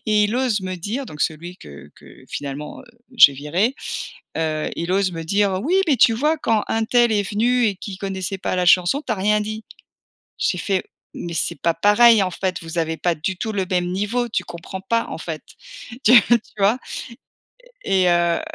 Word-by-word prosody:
et 210 Hz, -1 st, +3 dB
il 215 Hz, +4 st, -1 dB
ose 245 Hz, -6 st, +1 dB
me 185 Hz, 0 st, -4 dB
dire 225 Hz, +10 st, -4 dB
donc 150 Hz, -, -4 dB
celui 170 Hz, +3 st, -3 dB
que 70 Hz, 0 st, -13 dB
que -, -, -17 dB
finalement, 145 Hz, +1 st, -6 dB
heu, -, -, -17 dB, 0.3 s
j'ai 145 Hz, -11 st, +8 dB
viré. 170 Hz, -, -1 dB, 0.6 s
Heu, 155 Hz, -1 st, -1 dB
il 170 Hz, +1 st, -4 dB
ose 190 Hz, -1 st, +1 dB
me 165 Hz, -1 st, -5 dB
dire: 200 Hz, +3 st, +1 dB
«Oui 345 Hz, +8 st, +1 dB
mais 285 Hz, -5 st, +3 dB
tu 225 Hz, 0 st, +5 dB
vois, 300 Hz, +7 st, +1 dB
quand 225 Hz, -7 st, 0 dB
untel 225 Hz, +1 st, +2 dB
est 205 Hz, -1 st, +2 dB
venu 240 Hz, +4 st, +2 dB
et 200 Hz, -3 st, -1 dB
qui 195 Hz, 0 st, -7 dB
connaissait 190 Hz, 0 st, -4 dB
pas 185 Hz, -, -2 dB
la 180 Hz, -, 0 dB
chanson 180 Hz, -, +4 dB
tu 230 Hz, -, 0 dB
as -, -, 0 dB
rien 210 Hz, +2 st, +1 dB
dit». 215 Hz, +1 st, -5 dB, 0.8 s
J'ai 180 Hz, -, 0 dB
fait: 190 Hz, -1 st, -1 dB, 0.3 s
«Mais 170 Hz, -, -6 dB
c'est 150 Hz, -3 st, -1 dB
pas 170 Hz, -1 st, +1 dB
pareil, 210 Hz, +3 st, +5 dB
en 185 Hz, -, -1 dB
fait, 185 Hz, +1 st, -3 dB
vous 165 Hz, +1 st, -6 dB
avez 160 Hz, 0 st, -1 dB
pas 175 Hz, -1 st, 0 dB
du 180 Hz, +5 st, -3 dB
tout 220 Hz, -, -4 dB
le 195 Hz, -3 st, -1 dB
même 180 Hz, -2 st, 0 dB
niveau 210 Hz, +6 st, -1 dB
tu 185 Hz, -5 st, -2 dB
comprends 175 Hz, +3 st, -8 dB
pas 230 Hz, +3 st, 0 dB
en -, -, -6 dB
fait». -, -, -6 dB, 0.6 s
Tu 235 Hz, -, +6 dB
tu 235 Hz, -2 st, 0 dB
vois? 200 Hz, +5 st, +3 dB, 1.1 s
Et 190 Hz, -1 st, +2 dB
et 180 Hz, -, +4 dB
heu 175 Hz, -1 st, +2 dB
195 Hz, 205 wpm, -21 LUFS, 175-220 Hz, 1.1 s, j'ai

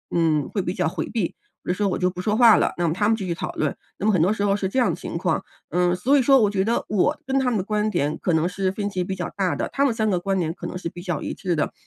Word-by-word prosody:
嗯， 160 Hz, -4 st, +2 dB
会 200 Hz, -, -1 dB
比 180 Hz, +1 st, -3 dB
较 -, -, 0 dB
回 -, -, -3 dB
避， 220 Hz, -7 st, 0 dB
比 -, -, -24 dB, 0.3 s
如 180 Hz, -, -1 dB
说 200 Hz, +1 st, 0 dB
我 -, -, -1 dB
就 180 Hz, 0 st, +1 dB
不 180 Hz, 0 st, -6 dB
说 210 Hz, +3 st, 0 dB
话 235 Hz, -3 st, +8 dB
了， -, -, +2 dB
那 175 Hz, -1 st, +1 dB
么 155 Hz, -, +1 dB
她 205 Hz, +3 st, +1 dB
们 225 Hz, -, +3 dB
继 195 Hz, -, -4 dB
续 170 Hz, -, 0 dB
讨 -, -, -4 dB
论， -, -, -1 dB, 0.2 s
那 -, -, -4 dB
么 215 Hz, -, +4 dB
很 180 Hz, -, +3 dB
多 185 Hz, +5 st, +3 dB
时 205 Hz, -2 st, -1 dB
候 200 Hz, 0 st, +2 dB
是 195 Hz, -2 st, -2 dB
这 260 Hz, -, 0 dB
样 250 Hz, -, +3 dB
的 -, -, -2 dB
情 -, -, -6 dB
况。 -, -, 0 dB, 0.3 s
嗯， 180 Hz, 0 st, +2 dB
所 260 Hz, +10 st, +3 dB
以 -, -, +4 dB
说 270 Hz, +1 st, +5 dB
我 210 Hz, -4 st, +3 dB
觉 195 Hz, -2 st, 0 dB
得 230 Hz, +3 st, 0 dB
我 215 Hz, +9 st, +1 dB
跟 270 Hz, 0 st, 0 dB
她 260 Hz, -2 st, +1 dB
们 230 Hz, -, 0 dB
的 190 Hz, -, -1 dB
观 215 Hz, 0 st, 0 dB
点 150 Hz, -7 st, -1 dB
可 180 Hz, -, 0 dB
能 160 Hz, +1 st, +2 dB
是 185 Hz, +1 st, -1 dB
分 205 Hz, +1 st, -3 dB
歧 185 Hz, -2 st, -2 dB
比 190 Hz, -, -3 dB
较 180 Hz, -1 st, -4 dB
大 190 Hz, -3 st, 0 dB
的， -, -, -1 dB
她 280 Hz, -, +2 dB
们 270 Hz, -5 st, +3 dB
三 220 Hz, -1 st, 0 dB
个 185 Hz, -3 st, +1 dB
观 195 Hz, +1 st, 0 dB
点 165 Hz, -2 st, -1 dB
可 175 Hz, -, -9 dB
能 -, -, -5 dB
是 180 Hz, -, -5 dB
比 175 Hz, -, -10 dB
较 175 Hz, -4 st, -3 dB
一 -, -, -4 dB
致 180 Hz, -3 st, -2 dB
的， -, -, -1 dB
195 Hz, 365 characters per minute, -23 LUFS, 175-215 Hz, 0.3 s, 话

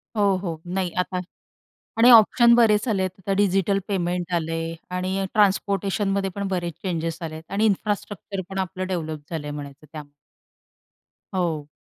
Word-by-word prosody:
हो, 200 Hz, -2 st, +3 dB
हो. 170 Hz, -4 st, -5 dB
नाही. 185 Hz, -1 st, -1 dB
आता 180 Hz, 0 st, -1 dB, 0.8 s
आणि 240 Hz, +2 st, +7 dB
ऑप्शन 235 Hz, +1 st, +7 dB
बरेच 220 Hz, -2 st, +4 dB
आलेत. 190 Hz, -4 st, +1 dB
आता 190 Hz, +1 st, -3 dB
डिजिटल 195 Hz, 0 st, +2 dB
पेमेंट 180 Hz, -2 st, -1 dB
आलंय 165 Hz, 0 st, -2 dB, 0.2 s
आणि 190 Hz, +1 st, -1 dB
ट्रान्सपोर्टेशनमध्ये 200 Hz, -1 st, +1 dB
पण 200 Hz, -1 st, -3 dB
बरेच 175 Hz, -3 st, -2 dB
चेंजस 165 Hz, -4 st, -2 dB
आलेत 160 Hz, -1 st, -6 dB
आणि 205 Hz, +2 st, +1 dB
इन्फ्रास्ट्रक्चर 205 Hz, -1 st, -2 dB
पण 195 Hz, 0 st, -5 dB
आपलं 185 Hz, 0 st, -3 dB
डेव्हलप 160 Hz, -5 st, -4 dB
झालंय 150 Hz, -3 st, -4 dB
म्हणायचं 145 Hz, 0 st, -8 dB
त्यामुळे. 150 Hz, -2 st, -9 dB, 1.2 s
हो. 160 Hz, -5 st, -1 dB
185 Hz, 135 wpm, -24 LUFS, 165-200 Hz, 1.2 s, आणि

